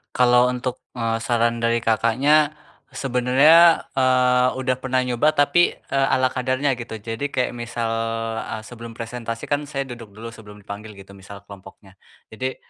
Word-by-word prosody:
Kalau 125 0 +4
untuk, 125 0 -4 0.2
eee, 115 -2 -1
saran 115 0 0
dari 115 0 0
Kakaknya 135 +8 +2 0.4
sebenernya, 140 +6 +4
eee, 125 -1 +3
udah 130 -1 -1
pernah 130 -1 0
nyoba, 125 +5 +1
tapi, 145 +4 +3
eee, 135 0 -1
ala 130 0 +2
kadarnya 130 +2 0
gitu, 115 -1 -7
jadi 115 +5 -5
kayak 130 -3 -1
misal, 120 -1 -4 0.5
eee, 110 - -6
sebelum 115 0 -10
presentasi 115 0 -6
kan 145 0 0
saya 140 -1 -3
duduk 120 -6 -11
dulu 115 +2 -8
sebelum 105 -2 -14
dipanggil 105 +2 -9
gitu, 100 0 -14
misal 100 0 -12
kelompoknya. 95 0 -15 0.3
Jadi 130 +4 -4
120 Hz, 150 wpm, -22 LUFS, 115-130 Hz, 0.5 s, Kalau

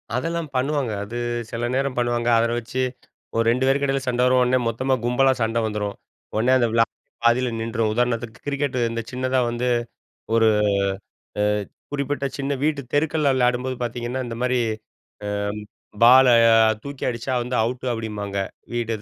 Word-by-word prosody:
அதெல்லாம் 165 +3 -2
பண்ணுவாங்க. 135 -2 0
அது 115 +4 -8 0.4
சில 120 +1 -2
நேரம் 135 -1 0
பண்ணுவாங்க. 120 0 0
அத 115 0 +1
வச்சு 125 +3 -4 0.5
ஒரு 115 - +3
2 125 +2 +1
பேருக்கும் 140 +1 +2
இடையில 135 0 +1
சண்டை 125 0 +1
வரும். 125 0 +4
உடனே 125 +1 +2
மொத்தமா 130 +4 0
கும்பலா 130 +2 +3
சண்ட 115 +1 +1
வந்துரும். 105 -1 -3 0.4
உடனே 115 +4 +2
அந்த 120 - +2
விளையா 115 0 +3 0.4
பாதியில 125 +2 +3
நின்றும். 115 -1 -1
உதாரணத்துக்கு 120 -1 -1
கிரிக்கெட் 140 -2 -1
இந்த 115 0 -3
சின்னதா 130 +1 0
வந்து 120 +1 -2 0.7
ஒரு 115 -1 +5 0.9
அ - - +3 0.5
குறிப்பிட்ட 140 0 -2
சின்ன 140 0 -2
வீட்டு 150 -2 +1
தெருக்கள்ல 150 -1 +2
விளையாடும்போது 125 0 +1
பார்த்தீங்கன்னா, 120 +2 -3
இந்தமாரி 125 +2 -1 0.7
அ - - -3 0.8
பால 130 +2 +8 0.3
அ - - +6 0.3
தூக்கி 140 -1 -7
அடிச்சா 120 +2 -3
வந்து 125 +1 -3
அவுட்டு 125 +2 -3
அப்பிடிம்பாங்க. 105 -3 -4 0.4
வீடு 115 -1 -1
125 Hz, 150 wpm, -23 LUFS, 115-135 Hz, 0.9 s, பால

